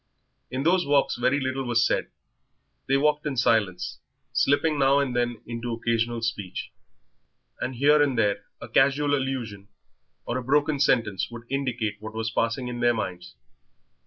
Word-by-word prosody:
In 130 Hz, +2 st, -3 dB
those 175 Hz, +3 st, +3 dB
walks 140 Hz, -1 st, +2 dB
very 130 Hz, +4 st, +1 dB
little 135 Hz, 0 st, -2 dB
was 120 Hz, -1 st, +2 dB
said. -, -, 0 dB, 0.8 s
They 135 Hz, -, +3 dB
walked 150 Hz, +1 st, +1 dB
in 135 Hz, -3 st, -3 dB
silence, 100 Hz, -6 st, +1 dB, 0.3 s
slipping 145 Hz, +2 st, +2 dB
now 135 Hz, 0 st, +4 dB
and 135 Hz, -3 st, 0 dB
then 120 Hz, -2 st, -1 dB
into 115 Hz, 0 st, -4 dB
occasional 115 Hz, 0 st, -1 dB
speech, 105 Hz, -5 st, -4 dB, 0.9 s
and 130 Hz, -, -3 dB
here 145 Hz, +4 st, +4 dB
and 140 Hz, -4 st, +2 dB
there 100 Hz, -2 st, +1 dB
a -, -, -8 dB
casual 140 Hz, +2 st, +3 dB
allusion 125 Hz, -8 st, -3 dB, 0.6 s
or 120 Hz, +2 st, -2 dB
a -, -, -7 dB
broken 145 Hz, +2 st, +2 dB
sentence 115 Hz, -8 st, +1 dB
would 120 Hz, -1 st, -9 dB
indicate 125 Hz, -6 st, -1 dB
what 110 Hz, +1 st, -8 dB
was 110 Hz, 0 st, -2 dB
passing 115 Hz, +3 st, -1 dB
in 120 Hz, -1 st, -5 dB
their 120 Hz, 0 st, +3 dB
minds. 90 Hz, -5 st, -5 dB
120 Hz, 160 wpm, -26 LUFS, 115-140 Hz, 0.9 s, now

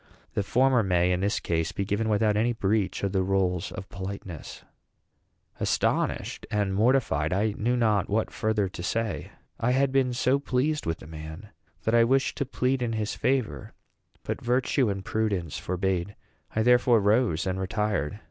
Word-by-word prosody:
The -, -, 0 dB
former 125 Hz, +4 st, +3 dB
may, 90 Hz, -3 st, +2 dB
in 90 Hz, -, +1 dB
this 100 Hz, +2 st, 0 dB
case, 80 Hz, -1 st, -1 dB
be 100 Hz, -, -3 dB
given 105 Hz, +3 st, -1 dB
without 105 Hz, 0 st, +2 dB
any 115 Hz, +3 st, +2 dB
breach 105 Hz, -3 st, 0 dB
of 100 Hz, -, 0 dB
the 95 Hz, -1 st, +1 dB
rules 95 Hz, -2 st, 0 dB
of 95 Hz, -, -7 dB
politeness." 95 Hz, -3 st, -7 dB, 1.0 s
Astonished -, -, 0 dB
and 105 Hz, -3 st, 0 dB
mortified, 105 Hz, -, +2 dB
I 105 Hz, +3 st, +1 dB
knew 120 Hz, +3 st, 0 dB
not 105 Hz, -5 st, +2 dB
what 110 Hz, +2 st, 0 dB
further 110 Hz, -2 st, 0 dB
to 90 Hz, -, -8 dB
say. 110 Hz, +3 st, -2 dB, 0.3 s
I 125 Hz, +2 st, +2 dB
had 135 Hz, +1 st, +2 dB
been 135 Hz, -2 st, +2 dB
so 130 Hz, +3 st, +2 dB
pleased 140 Hz, -, -1 dB
with 80 Hz, 0 st, -1 dB
the -, -, -13 dB
man 80 Hz, +5 st, -9 dB, 0.3 s
that 110 Hz, -, 0 dB
I 115 Hz, 0 st, +6 dB
wished 135 Hz, +3 st, +2 dB
to 140 Hz, -, -1 dB
plead 130 Hz, -1 st, 0 dB
in 120 Hz, -2 st, -1 dB
his 110 Hz, -1 st, -2 dB
favor; 115 Hz, -, -1 dB, 0.5 s
but -, -, -4 dB
virtue 125 Hz, 0 st, +1 dB
and 95 Hz, -1 st, -4 dB
prudence 100 Hz, -8 st, -1 dB
forbade. 95 Hz, +1 st, -2 dB, 0.4 s
I 110 Hz, -, +2 dB
therefore 120 Hz, -1 st, +5 dB
rose 105 Hz, -4 st, +2 dB
and 95 Hz, 0 st, -1 dB
retired. 100 Hz, -3 st, -1 dB
105 Hz, 170 wpm, -27 LUFS, 95-120 Hz, 1.0 s, I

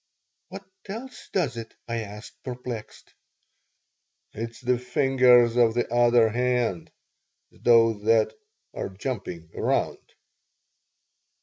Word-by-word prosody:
"What 195 Hz, 0 st, -10 dB, 0.2 s
else 240 Hz, +5 st, -8 dB
does 145 Hz, -, 0 dB
it?" 115 Hz, -1 st, -8 dB
I 115 Hz, 0 st, -2 dB
asked, 105 Hz, 0 st, -8 dB
perplexed 125 Hz, -3 st, -7 dB, 1.2 s
"It's 115 Hz, +2 st, -6 dB
the 125 Hz, -1 st, 0 dB
fingers 125 Hz, -2 st, +4 dB
of 115 Hz, -2 st, +4 dB
the 120 Hz, -1 st, -1 dB
other 120 Hz, -1 st, +5 dB
hand, 120 Hz, -6 st, -1 dB, 0.6 s
those 115 Hz, -3 st, +3 dB
that 110 Hz, -1 st, +3 dB, 0.4 s
are -, -, -4 dB
jumping 95 Hz, -6 st, -6 dB
around." -, -, 0 dB
120 Hz, 100 wpm, -25 LUFS, 110-125 Hz, 1.2 s, other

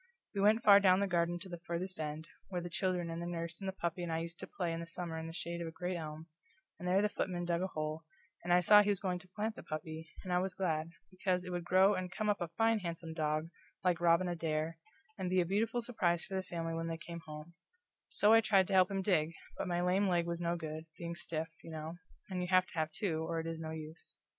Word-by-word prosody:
We 200 Hz, -, 0 dB
went 215 Hz, +3 st, +5 dB
far 200 Hz, -2 st, +9 dB
down 190 Hz, -2 st, +5 dB
the 200 Hz, -, +2 dB
garden 175 Hz, -2 st, +1 dB
to 190 Hz, -, -7 dB
the 175 Hz, -2 st, -7 dB
farthest 175 Hz, +2 st, -4 dB
end, 155 Hz, +1 st, -4 dB, 0.2 s
where 180 Hz, -2 st, -2 dB
the 175 Hz, 0 st, -6 dB
children 180 Hz, -2 st, 0 dB
and 165 Hz, +1 st, -4 dB
the 170 Hz, -, -3 dB
nurse 170 Hz, -1 st, -4 dB
and 195 Hz, -, -3 dB
the -, -, 0 dB
puppy 175 Hz, -2 st, -3 dB
and 175 Hz, -1 st, -3 dB
I 160 Hz, -, +1 dB
used 165 Hz, +1 st, -5 dB
to -, -, -6 dB
play 175 Hz, -3 st, -2 dB
in 165 Hz, -, -3 dB
the 170 Hz, -, -6 dB
summer 170 Hz, -1 st, -4 dB
in 160 Hz, -, -5 dB
the -, -, -5 dB
shade 170 Hz, +1 st, -4 dB
of 170 Hz, -, -3 dB
a -, -, -5 dB
great 180 Hz, +2 st, -3 dB
elm, 155 Hz, -1 st, -6 dB, 0.5 s
and 180 Hz, -, -4 dB
there 190 Hz, +3 st, +4 dB
the -, -, +4 dB
footman 180 Hz, -4 st, -2 dB
dug 170 Hz, 0 st, +1 dB
a 190 Hz, -, +1 dB
hole, 155 Hz, -2 st, -3 dB, 0.4 s
and 175 Hz, -, -1 dB
I 175 Hz, 0 st, +6 dB
saw 210 Hz, +4 st, +8 dB
he 205 Hz, -, +1 dB
was 200 Hz, -2 st, +2 dB
going 180 Hz, -3 st, -1 dB
to 185 Hz, -, -14 dB
plant 215 Hz, +4 st, -3 dB
the -, -, -8 dB
puppy, 155 Hz, +1 st, -6 dB
and 180 Hz, -, -2 dB
I 180 Hz, -, +4 dB
was 185 Hz, 0 st, -2 dB
glad, 160 Hz, -4 st, 0 dB, 0.2 s
because 185 Hz, -1 st, 0 dB
it 180 Hz, -, -5 dB
would 175 Hz, -1 st, -3 dB
grow 190 Hz, +3 st, +6 dB
and 185 Hz, -2 st, -3 dB
come 215 Hz, +2 st, -1 dB
up 205 Hz, -2 st, +1 dB
a 175 Hz, -, 0 dB
fine 225 Hz, +6 st, +2 dB
handsome 170 Hz, -3 st, -5 dB
dog, 155 Hz, 0 st, 0 dB, 0.3 s
like 175 Hz, -2 st, +2 dB
Robin 170 Hz, +1 st, +4 dB
Adair, 165 Hz, -1 st, -1 dB, 0.4 s
and 185 Hz, -1 st, -1 dB
be 185 Hz, 0 st, +3 dB
a 175 Hz, -, +3 dB
beautiful 225 Hz, +6 st, 0 dB
surprise 175 Hz, -8 st, +1 dB
for -, -, -9 dB
the 190 Hz, -, +1 dB
family 165 Hz, -3 st, -4 dB
when 165 Hz, 0 st, -2 dB
they 165 Hz, 0 st, -2 dB
came 170 Hz, +1 st, -8 dB
home; 150 Hz, +2 st, -8 dB, 0.6 s
so 210 Hz, +2 st, +5 dB
I 225 Hz, -, +8 dB
tried 195 Hz, -4 st, +4 dB
to -, -, 0 dB
help 185 Hz, -1 st, +6 dB
him 195 Hz, -1 st, -1 dB
dig, 165 Hz, -5 st, +2 dB, 0.3 s
but -, -, -1 dB
my 175 Hz, -1 st, 0 dB
lame 190 Hz, +3 st, +3 dB
leg 175 Hz, -2 st, +2 dB
was 170 Hz, 0 st, -3 dB
no 170 Hz, 0 st, +1 dB
good, 160 Hz, -1 st, -5 dB
being 170 Hz, 0 st, -4 dB
stiff, 165 Hz, -1 st, -3 dB
you -, -, -9 dB
know, 160 Hz, +1 st, -5 dB, 0.3 s
and 185 Hz, -2 st, -3 dB
you 180 Hz, -, -1 dB
have 185 Hz, 0 st, +5 dB
to -, -, -16 dB
have 155 Hz, -2 st, 0 dB
two, 160 Hz, -1 st, -1 dB
or 165 Hz, -1 st, -1 dB
it 160 Hz, -, -4 dB
is 165 Hz, 0 st, -4 dB
no 160 Hz, -1 st, -4 dB
use. 160 Hz, +1 st, -8 dB
175 Hz, 270 wpm, -34 LUFS, 165-185 Hz, 0.6 s, far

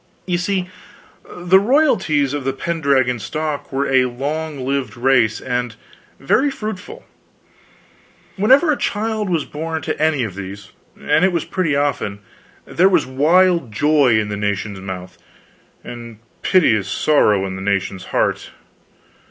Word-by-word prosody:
You 175 Hz, -2 st, -1 dB
see, 185 Hz, 0 st, -1 dB, 0.6 s
the 180 Hz, +2 st, +3 dB
royalties 195 Hz, -, +2 dB
of 145 Hz, -2 st, -3 dB
the 135 Hz, +1 st, -1 dB
Pendragon 135 Hz, -5 st, 0 dB
stock 155 Hz, +4 st, -4 dB
were 140 Hz, +1 st, -1 dB
a 130 Hz, -1 st, +3 dB
long 145 Hz, +3 st, -4 dB
lived 135 Hz, -5 st, -2 dB
race 120 Hz, -3 st, +2 dB
and 125 Hz, -2 st, -3 dB, 0.4 s
very 265 Hz, -, +2 dB
fruitful. 220 Hz, -, -7 dB, 1.3 s
Whenever 265 Hz, -, +4 dB
a 290 Hz, -, 0 dB
child 215 Hz, -1 st, -2 dB
was 165 Hz, -5 st, 0 dB
born 160 Hz, +1 st, -5 dB
to 155 Hz, -1 st, -3 dB
any 155 Hz, -4 st, +2 dB
of 110 Hz, -5 st, -4 dB
these 100 Hz, +1 st, -9 dB, 0.3 s
and 160 Hz, -, +1 dB
it 190 Hz, -, +4 dB
was 170 Hz, -3 st, -2 dB
pretty 175 Hz, -6 st, -1 dB
often 140 Hz, -8 st, -1 dB, 0.5 s
there 185 Hz, +3 st, +3 dB
was 175 Hz, -6 st, +2 dB
wild 165 Hz, +1 st, +2 dB
joy 140 Hz, 0 st, +3 dB
in 105 Hz, -1 st, -2 dB
the 105 Hz, -, -3 dB
nation's 100 Hz, -1 st, -3 dB
mouth, 95 Hz, -1 st, -8 dB, 0.6 s
and 120 Hz, -2 st, -9 dB, 0.2 s
piteous 110 Hz, -, +2 dB
sorrow 105 Hz, -10 st, +2 dB
in 95 Hz, -1 st, -5 dB
the 95 Hz, -, -7 dB
nation's 95 Hz, -1 st, -2 dB
heart. -, -, -1 dB
140 Hz, 140 wpm, -19 LUFS, 115-175 Hz, 1.3 s, Whenever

